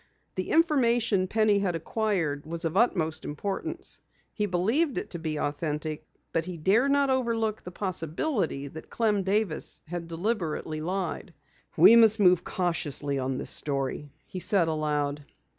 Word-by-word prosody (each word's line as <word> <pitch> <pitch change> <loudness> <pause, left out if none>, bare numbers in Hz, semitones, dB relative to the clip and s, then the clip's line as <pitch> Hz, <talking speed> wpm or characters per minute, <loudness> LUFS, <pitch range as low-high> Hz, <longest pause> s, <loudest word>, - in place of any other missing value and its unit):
The - - -4
information 240 - +3
Penny 215 0 +2
had 185 -4 -1
acquired 165 -5 -1
was 170 +1 -3
of 165 +1 -2
utmost 160 -8 +1
importance. 190 +7 -3 0.3
He 210 -1 -1
believed 225 - +1
it - - -4
to 170 - -2
be 155 -2 -3
authentic, 150 +1 -3 0.3
but 165 0 0
he 180 -1 -6
dared 205 - +3
not 280 -1 +3
overlook 230 -4 0
the - - -8
possibility 175 - -2
that 160 +3 -10
Clem 215 -3 +1
Davis 195 -3 -1
had 170 +1 -6
deliberately 165 -4 -2
lied. 185 +4 -4 0.4
"We 230 - +8
must 220 -1 +6
move 180 -3 +5
cautiously 145 -6 -2
on 130 0 -2
this - - -3
story," 140 0 -1 0.2
he 185 - -7
said 180 -2 +3
aloud. 150 -2 -1
180 Hz, 145 wpm, -27 LUFS, 155-215 Hz, 0.4 s, We